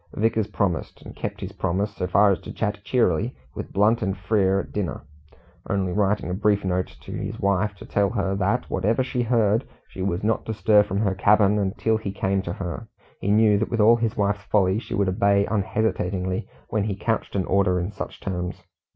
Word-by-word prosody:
Vickers 110 Hz, 0 st, +1 dB
promised, 100 Hz, -5 st, -2 dB
and -, -, -11 dB
kept -, -, -5 dB
his -, -, -5 dB
promise 100 Hz, +4 st, -2 dB
so 90 Hz, -, -2 dB
far 100 Hz, +3 st, +5 dB
as 95 Hz, -, 0 dB
to -, -, -9 dB
chat 105 Hz, -2 st, -2 dB
cheerily 115 Hz, -2 st, +1 dB, 0.2 s
with -, -, -7 dB
Blunt 110 Hz, +4 st, +3 dB
and 95 Hz, -2 st, -1 dB
Frere 95 Hz, 0 st, +2 dB
at -, -, -12 dB
dinner, 100 Hz, -5 st, -3 dB, 0.7 s
only 95 Hz, -2 st, 0 dB
writing 105 Hz, 0 st, +1 dB
a 90 Hz, -, -2 dB
brief 100 Hz, 0 st, +1 dB
note 90 Hz, 0 st, -2 dB
to -, -, -10 dB
his -, -, -5 dB
wife 100 Hz, +1 st, +1 dB
to 100 Hz, -, -11 dB
tell 100 Hz, -1 st, +1 dB
her 100 Hz, -3 st, -1 dB
that, 100 Hz, +5 st, 0 dB
whatever 115 Hz, +6 st, +1 dB
she 125 Hz, -1 st, -2 dB
heard, 115 Hz, -1 st, +2 dB, 0.2 s
she 95 Hz, -, -8 dB
was 95 Hz, 0 st, -1 dB
not 110 Hz, +1 st, +1 dB
to 110 Hz, -, -2 dB
stir 105 Hz, -1 st, +5 dB
from 100 Hz, 0 st, -1 dB
her 100 Hz, -3 st, +1 dB
cabin 105 Hz, +2 st, +4 dB
until 105 Hz, +3 st, 0 dB
he 105 Hz, -3 st, -4 dB
came 95 Hz, 0 st, 0 dB
to 85 Hz, -2 st, -4 dB
her; 95 Hz, +5 st, -5 dB, 0.3 s
he 100 Hz, -, -2 dB
knew 105 Hz, -1 st, +4 dB
that, 110 Hz, -, -1 dB
with 115 Hz, -, -2 dB
all 115 Hz, +2 st, +6 dB
his 115 Hz, 0 st, -1 dB
wife's 100 Hz, 0 st, +1 dB
folly, 95 Hz, -1 st, +2 dB
she -, -, -5 dB
would 100 Hz, -1 st, +1 dB
obey 100 Hz, +1 st, +3 dB
unhesitatingly, 95 Hz, -3 st, -1 dB, 0.2 s
when 105 Hz, -2 st, 0 dB
he 105 Hz, -3 st, -2 dB
couched 110 Hz, +2 st, -2 dB
an 95 Hz, -, 0 dB
order 95 Hz, -2 st, +2 dB
in 90 Hz, +4 st, -3 dB
such 100 Hz, -, -7 dB
terms. 90 Hz, -1 st, -4 dB
100 Hz, 210 wpm, -24 LUFS, 95-110 Hz, 0.7 s, all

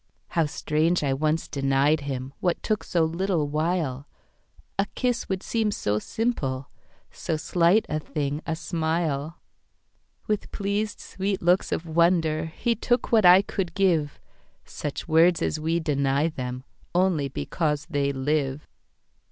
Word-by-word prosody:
How 165 Hz, -3 st, +1 dB
strange 155 Hz, +3 st, 0 dB
I 135 Hz, -2 st, +1 dB
once 155 Hz, +3 st, 0 dB
denied 140 Hz, +2 st, +2 dB
himWhat 140 Hz, +5 st, -3 dB
took 215 Hz, -1 st, 0 dB
so 170 Hz, -2 st, +1 dB
little 170 Hz, -1 st, 0 dB
while.A 155 Hz, +4 st, -4 dB
kiss 250 Hz, -2 st, -1 dB
would 190 Hz, -1 st, -2 dB
seem 225 Hz, -2 st, 0 dB
so 105 Hz, -, -1 dB
simple, 135 Hz, -, -2 dB, 0.4 s
So 160 Hz, -, -3 dB
slight 175 Hz, +6 st, +3 dB
a 155 Hz, -, -1 dB
thing 150 Hz, -1 st, -3 dB
a 160 Hz, -, 0 dB
smile. 160 Hz, -2 st, -2 dB, 0.9 s
With 210 Hz, -1 st, -2 dB
pleased 205 Hz, +1 st, -2 dB
sweet 195 Hz, 0 st, -3 dB
looks 180 Hz, +2 st, +3 dB
of -, -, -1 dB
wonderHe 165 Hz, +5 st, +1 dB
took 245 Hz, 0 st, +1 dB
what 220 Hz, -4 st, +5 dB
I 185 Hz, +2 st, +8 dB
could 190 Hz, -3 st, -3 dB
give,—Such 155 Hz, -4 st, -3 dB
words 165 Hz, +2 st, +5 dB
as 155 Hz, -, -1 dB
we 165 Hz, +2 st, 0 dB
deny 140 Hz, -1 st, +1 dB
themOnly 140 Hz, +4 st, -2 dB
because 150 Hz, -1 st, -1 dB
they 140 Hz, -4 st, 0 dB
live. 140 Hz, +1 st, -1 dB
160 Hz, 125 wpm, -25 LUFS, 145-180 Hz, 0.9 s, I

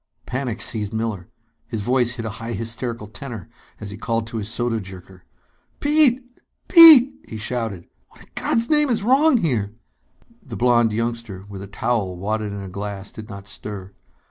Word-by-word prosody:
Panic 125 Hz, -3 st, -4 dB
seized 105 Hz, -1 st, 0 dB
Miller. 110 Hz, -5 st, -4 dB, 0.4 s
His 115 Hz, -3 st, -4 dB
voice 125 Hz, +2 st, +2 dB
hit 115 Hz, -1 st, -6 dB
a -, -, -3 dB
high 115 Hz, +1 st, -5 dB
hysterical 115 Hz, +1 st, -4 dB
tenor 115 Hz, +2 st, -8 dB, 0.3 s
as 105 Hz, -2 st, -7 dB
he 100 Hz, -, -8 dB
called 115 Hz, +1 st, -2 dB
to 115 Hz, 0 st, -6 dB
his 105 Hz, -1 st, -4 dB
soda 120 Hz, 0 st, -1 dB
jerker. 95 Hz, -1 st, -12 dB, 0.5 s
"Pete! 265 Hz, -4 st, +2 dB, 0.3 s
Pete!" 315 Hz, -6 st, +10 dB
he 110 Hz, -, -7 dB
shouted. 110 Hz, -5 st, -4 dB, 0.2 s
"What -, -, -18 dB
in -, -, -23 dB
God's 230 Hz, 0 st, 0 dB
name 300 Hz, -2 st, +2 dB
is 225 Hz, -4 st, 0 dB
wrong 270 Hz, +5 st, +4 dB
here!" 125 Hz, -, -1 dB, 0.7 s
The -, -, -9 dB
blond 120 Hz, -2 st, +3 dB
youngster, 115 Hz, -3 st, -4 dB
with 100 Hz, -2 st, -9 dB
a 100 Hz, -, -8 dB
towel 100 Hz, -2 st, -2 dB
wadded 105 Hz, +2 st, -3 dB
in 100 Hz, -1 st, -6 dB
a -, -, -7 dB
glass, 100 Hz, +1 st, -6 dB
did 110 Hz, +1 st, -11 dB
not 100 Hz, -2 st, -10 dB
stir. 100 Hz, -2 st, -8 dB
115 Hz, 170 wpm, -21 LUFS, 100-125 Hz, 0.7 s, Pete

